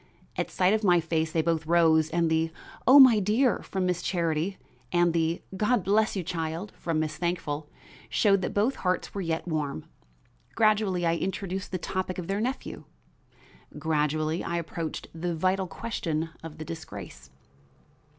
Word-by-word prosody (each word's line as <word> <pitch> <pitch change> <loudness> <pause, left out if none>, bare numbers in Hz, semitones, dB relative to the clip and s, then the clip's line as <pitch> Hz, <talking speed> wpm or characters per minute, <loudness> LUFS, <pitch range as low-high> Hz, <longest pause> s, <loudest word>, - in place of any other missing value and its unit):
At - - -2
sight 185 +2 +2
of 220 0 0
my 175 -3 +5
face 160 -1 -1
they 160 -1 +1
both 160 -1 0
rose 160 -2 +4
and 170 0 +1
the 160 0 +1 0.4
"O 265 +3 +9
my 250 -5 +8
dear" 215 +5 +2
from 190 -1 -3
Miss 180 -1 0
Charity 170 +1 -1 0.3
and 175 -1 +3
the 165 0 0
"God 215 +1 +2
bless 210 +4 +2
you, 190 - -2
child," 165 +3 -4
from 165 -2 -2
Miss 155 -1 -2
Thankful 155 -3 -2 0.4
showed 200 -3 +3
that - - -2
both 220 +7 +2
hearts 185 -1 -1
were 200 - -3
yet 165 -1 -2
warm. 150 - -2 0.7
Gradually 210 -5 +2
I 165 0 +2
introduced 190 +1 -3
the 185 - -1
topic 185 +1 -3
of 180 - -4
their 195 +4 -1
nephew; 255 +4 -4 0.9
gradually 155 +1 0
I 170 - -2
approached 165 -1 -4
the 170 +1 -3
vital 185 +3 +1
question 165 -5 -3
of 160 -1 -9
the 155 - -7
disgrace. 160 - -8
170 Hz, 160 wpm, -27 LUFS, 160-195 Hz, 0.9 s, O